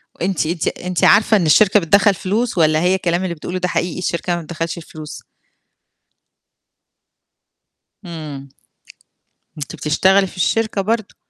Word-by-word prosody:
وأنتِ 180 -3 -1
أنتِ 165 +1 -2
أنتِ 180 -1 -3
عارفة 215 +1 +5
إن 175 - 0
الشركة 205 +7 +5
بتدخّل 200 +3 +3
فلوس، 205 +4 -2
والّا 155 -1 +3
هي 180 +2 +2
الكلام 175 -1 -1
اللي 170 -2 -3
بتقوله 180 +4 -5
ده 180 - -1
حقيقي 175 0 -2
الشركة 175 0 -2
ما 170 - -4
بتدخّلش 165 +1 -5
فلوس؟ 155 -2 -10 2.8
امم. 150 -5 -8 1.1
أنتِ 145 - -7
بتشتغلي 190 +6 +2
في 180 - -14
الشركة 220 +2 0
برضه. 220 +1 -2
180 Hz, 135 wpm, -18 LUFS, 165-195 Hz, 2.8 s, عارفة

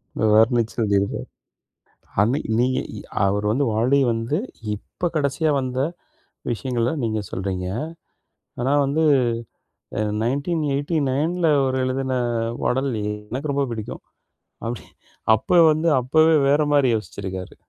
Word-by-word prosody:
அத - - -2
வர்ணிச்சு 115 +1 +3
எழுதிருப்பாரு. 100 -2 0 0.9
அன்னைக்கு 115 +4 +1
நீங்க 130 +1 +1 0.2
இ - - -6 0.3
அவர் 100 +1 +1
வந்து, 135 +6 +1
வாலி 125 +6 +2
வந்து 115 +7 -1 0.4
இப்ப 175 - -4
கடைசியா 150 +2 +1
வந்த 130 0 -3 0.7
விஷயங்கள 120 0 -1
நீங்க 110 -1 -1
சொல்றீங்க. 95 -1 -3 0.9
ஆனா 130 +3 +1
வந்து 145 +4 +1 1.0
அ - - +1 0.2
1989ல 145 +3 0
அவரு 130 -1 +1
எழுதின 130 0 -1 0.5
பாடல், 135 +2 +1
எ - - -2 0.2
எனக்கு 140 +5 -3
ரொம்ப 140 0 +1
புடிக்கும். 110 -2 -6 0.6
அப்படி 115 0 -4 0.5
அப்ப 175 +11 +2
வந்து 155 +2 0
அப்பவே 155 +6 +4
வேற 145 +2 +4
மாரி 140 -3 +4
யோசிச்சிருக்காரு. 95 -2 -5
130 Hz, 115 wpm, -22 LUFS, 110-145 Hz, 1.0 s, அப்பவே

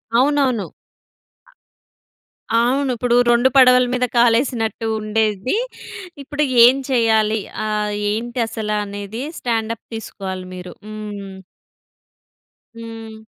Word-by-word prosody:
అవునవును. 260 -4 +2 1.9
అవును 255 +4 +2
ఇప్పుడు 240 +1 +1
2 240 +2 +4
పడవల 250 -1 +7
మీద 250 0 +1
కాలేసినట్టు 230 -2 +2
ఉండేది. 215 - 0 0.7
ఇప్పుడు 295 +2 -2 0.2
ఏం 250 +2 +6
చేయాలి? 220 -3 +2 0.3
ఆహ్, 210 -1 -1 0.2
ఏంటి 235 +3 -3
అసల 220 -2 -4
అనేది 205 +4 -6 0.2
స్టాండప్ 230 -1 -2
తీసుకోవాలి 190 -4 -6
మీరు 180 0 -8
హ్మ్. 205 -2 -7 1.4
హ్మ్. 225 -1 -9
225 Hz, 90 wpm, -20 LUFS, 215-245 Hz, 1.9 s, పడవల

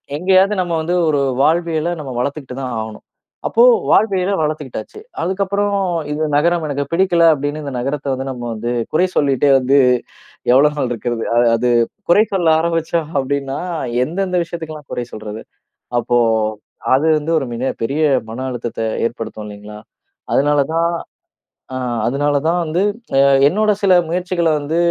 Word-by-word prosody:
எங்கேயாவது 190 +5 +3
நம்ம 175 -2 -2
வந்து 175 +3 -1
ஒரு 145 -2 +2 0.2
வாழ்வியல 165 +1 +1
நம்ம 135 -3 -6
வளர்த்துக்கிட்டு 135 -1 -4
தான் 125 -2 -4
ஆகணும். 110 -1 -7 0.4
அப்போ 470 - +3 0.3
வாழ்வியல 195 -2 +2
வளர்த்துக்கிட்டாச்சு. 150 - -4 0.2
அதுக்கப்புறம் 200 +2 0 0.3
இந்த 155 +1 -1
நகரம் 170 +2 +2
எனக்கு 140 0 -2
பிடிக்கல, 175 -2 +3
அப்படின்னு 145 +2 -3
இந்த 140 -2 -5
நகரத்த 140 +1 -2
வந்து 135 +1 -5
நம்ம 120 -2 -7
வந்து 120 +2 -3 0.2
குறை 180 +4 +3
சொல்லிட்டே 140 0 +3
வந்து 135 +2 +2 0.7
எவ்வளோ 145 +4 +5
நாள் 130 -3 -1
இருக்கிறது. 120 0 -3
அது 120 0 +4
அது 120 +2 0 0.4
குறை 205 +5 +6
சொல்ல 175 -4 +2
ஆரம்பிச்சோம் 165 -1 -1
அப்படின்னா, 135 0 -2 0.5
எந்தெந்த 185 +2 -2
விஷயத்துக்கெல்லா 160 -3 -7
குறை 120 - -3
சொல்றது? 110 0 -7 0.6
அப்போ 120 +1 +1 0.8
அது 145 +4 +1
வந்து 155 +3 -4
ஒரு 135 - -4
மிக 130 +3 -1
பெரிய 140 +7 -1 0.3
மன 130 +3 -5
அழுத்தத்த 120 -2 -5 0.3
ஏற்படுத்தும் 115 -2 -7
இல்லைங்களா? 105 +1 -10 0.5
அதுனால 145 +1 +3 0.2
தான் 170 +1 +2 0.8
ஆ - - -2 0.3
அதனால 145 +3 0
தான் 175 +1 +2
வந்து 165 +4 -1 0.7
என்னோட 215 +6 +2
சில 190 -2 +4 0.2
முயற்சிகளை 175 -2 0
வந்து 150 +3 -2
150 Hz, 140 wpm, -18 LUFS, 130-170 Hz, 0.8 s, குறை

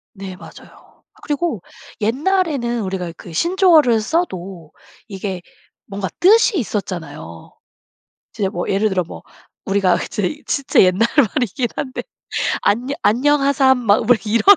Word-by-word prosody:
네 190 -2 -8
맞아요. 180 - -16
아 - - -29
그리고 295 - -2 0.4
옛날에는 270 - 0
우리가 185 -3 -4
그 170 - -11
신조어를 330 - +4
써도 190 - -3 0.4
이게 190 -3 -5 0.4
뭔가 195 -1 -4
뜻이 430 +4 +5
있었잖아요. 160 - -6 0.8
진짜 200 -3 -2
뭐 175 - -4
예를 200 +3 +2
들어 185 -1 +1
뭐 - - -11 0.4
우리가 195 -2 +2
이제 210 +8 -3
진짜 280 -2 +2
옛날 185 +4 +3
말이긴 245 -1 +1
한데 260 -2 -4 0.6
"안녀 245 +7 +1
안녕하삼." 275 +1 +3
막 220 -3 +3
뭐 245 - +6
이런 225 +2 +1
220 Hz, 270 characters per minute, -19 LUFS, 190-280 Hz, 0.8 s, 뭐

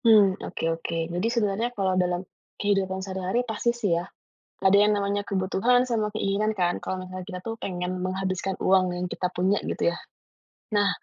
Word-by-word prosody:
Mmm, 210 -4 +7
oke - - -6 0.2
oke 170 - -3 0.2
jadi 180 +5 0
sebenarnya 220 +1 +1
kalau 190 -2 +1
dalam, 180 0 0 0.3
kehidupan 195 -2 +1
sehari-hari 190 +4 -1
pasti 225 +1 -1
sih 235 -4 -1
ya, 175 - -3 0.6
ada 190 +1 +6
yang 210 - +4
namanya 200 0 0
kebutuhan 195 +6 +2
sama 225 -3 +1
keinginan 210 +1 +1
kan 175 -1 +1
kalau 185 - -2
misalnya 185 0 -7
kita 185 -3 -5
tuh 225 +2 -4
pengen 180 -1 -2
menghabiskan 190 0 -1
uang 190 -1 +5
yang 180 +1 -2
kita 180 - -1
punya 190 +3 +2
gitu - - +1
ya, - - -5 0.8
nah, 205 -1 +4
195 Hz, 175 wpm, -26 LUFS, 185-210 Hz, 0.8 s, Mmm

